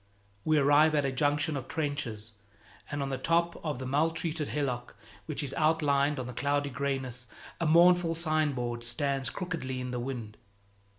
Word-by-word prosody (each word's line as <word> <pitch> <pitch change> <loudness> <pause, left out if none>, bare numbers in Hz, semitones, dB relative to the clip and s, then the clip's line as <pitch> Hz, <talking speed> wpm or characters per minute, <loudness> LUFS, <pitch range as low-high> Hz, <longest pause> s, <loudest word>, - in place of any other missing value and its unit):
We 155 -1 +3
arrive 145 +2 +5
at 145 -2 +2
a 135 - 0
junction 145 +3 +1
of 135 -2 -5
trenches, 140 -8 -3 0.6
and 145 -1 -2
on 135 - -3
the 135 - -3
top 170 +1 +1
of 150 -5 -2
the 130 - -5
maltreated 155 +2 0
hillock 125 -5 -3 0.3
which 155 -1 -2
is 140 -1 -4
outlined 150 -2 +2
on 130 - -3
the 125 - -6
cloudy 145 +2 0
grayness, 130 -2 -3 0.3
a 170 - 0
mournful 170 +1 +5
signboard 145 -8 0
stands 135 +2 0
crookedly 160 -7 -4
in 125 0 -4
the 125 - -2
wind. 120 -4 -5
145 Hz, 165 wpm, -30 LUFS, 130-155 Hz, 0.6 s, arrive